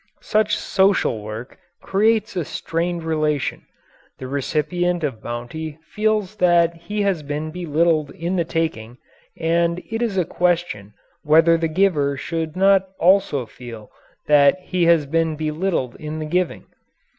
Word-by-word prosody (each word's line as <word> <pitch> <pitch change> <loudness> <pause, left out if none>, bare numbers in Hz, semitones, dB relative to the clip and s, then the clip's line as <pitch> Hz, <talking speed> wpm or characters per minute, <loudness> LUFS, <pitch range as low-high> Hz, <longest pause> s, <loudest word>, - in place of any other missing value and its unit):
Such 215 -1 +1
"social 190 - +2
work" 110 +4 -8 0.2
creates 215 +1 +1
a 175 - 0
strained 170 +3 -3
relation 155 -3 -1 0.5
the 130 - -8
recipient 155 +6 -1
of 130 -7 -3
bounty 145 +6 -6 0.2
feels 215 -1 0
that 170 -1 +4
he 205 +5 -3
has 195 -5 0
been 150 +2 -4
belittled 165 -2 +1
in 170 +3 -3
the 175 - +2
taking, 155 -9 -3 0.4
and 170 +1 +1
it 225 +1 -2
is 225 -5 -1
a 180 - +2
question 170 - -1 0.3
whether 165 +2 +5
the 165 0 0
giver 155 -5 +1
should 160 +2 -4
not 190 0 +4
also 175 -8 +3
feel 115 -1 -11 0.3
that 145 +2 +5
he 180 -1 0
has 165 -3 +4
been 160 +2 0
belittled 155 -4 -2
in 155 0 -6
the 155 - -4
giving. 180 +3 -1
165 Hz, 140 wpm, -21 LUFS, 150-180 Hz, 0.5 s, whether